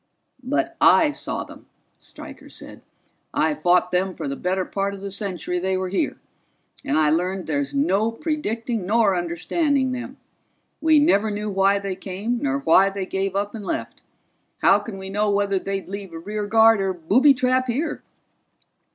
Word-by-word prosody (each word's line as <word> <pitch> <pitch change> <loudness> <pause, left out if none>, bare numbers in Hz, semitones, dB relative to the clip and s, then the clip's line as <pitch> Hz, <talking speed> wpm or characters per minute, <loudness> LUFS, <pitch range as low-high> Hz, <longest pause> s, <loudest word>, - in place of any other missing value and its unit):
"But 320 +6 -1 0.2
I 310 -2 +3
saw - - -4
them," - - -14 0.3
Stryker - - -11
said. - - -10 0.5
"I - - +2
fought 180 -8 +2
them 185 0 0
for - - -5
the 140 - -3
better 185 +4 -1
part 200 0 -2
of 195 - -11
the 200 0 -6
century 185 -3 -3
they 190 +1 -1
were 185 0 -3
here, 190 - -1 0.7
and 140 - 0
I 155 -1 +3
learned 180 +3 -1
there's 140 -2 -2
no 190 +10 +2
predicting 230 - -3
nor 215 -2 +3
understanding 260 - 0
them. 255 +2 -6 0.6
We 315 -1 +5
never 220 -8 +3
knew 210 0 -3
why 195 +1 +3
they 200 -1 -4
came 200 +6 -3
nor 280 -1 -1
why 195 -2 +5
they 195 -1 -4
gave 195 0 -2
up 200 +1 -1
and 220 -3 -7
left. 115 -11 -4 0.6
How 200 - +6
can 205 -1 -8
we 190 0 -7
know 210 +1 +1
whether 200 -1 +1
they'd 195 0 -4
leave 195 -2 -7
a - - -6
rear 205 +5 -4
guard 225 -1 +5
or 190 -1 0
booby 235 - +4
trap 255 0 +1
here?" 270 +7 -2
200 Hz, 175 wpm, -23 LUFS, 185-230 Hz, 0.7 s, How